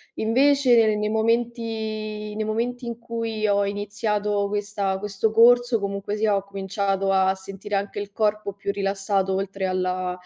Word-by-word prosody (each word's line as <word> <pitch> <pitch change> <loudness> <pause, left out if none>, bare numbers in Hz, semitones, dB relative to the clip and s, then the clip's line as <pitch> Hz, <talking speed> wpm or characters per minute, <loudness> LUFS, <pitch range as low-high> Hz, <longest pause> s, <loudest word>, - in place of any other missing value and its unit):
Invece, 265 +3 +4 0.2
nei 210 0 -1
momenti 220 -2 -2
nei 215 0 -2
momenti 240 +3 -2
in 235 -1 -5
cui 230 -2 -3
ho 200 0 +2
iniziato 205 0 -1
questa 200 -1 -2
questo 210 +1 -1
corso, 240 +1 +5
comunque 200 0 -3
sia, 210 -1 +2
ho 195 - -1
cominciato 195 0 -1
a 190 0 +3
sentire 195 +1 -9
anche 200 +1 -2
il 205 0 -6
corpo 210 -1 -1
più 200 +1 -3
rilassato 195 -1 0
oltre 195 0 -2
alla, 185 0 -1
205 Hz, 145 wpm, -24 LUFS, 195-220 Hz, 0.2 s, corso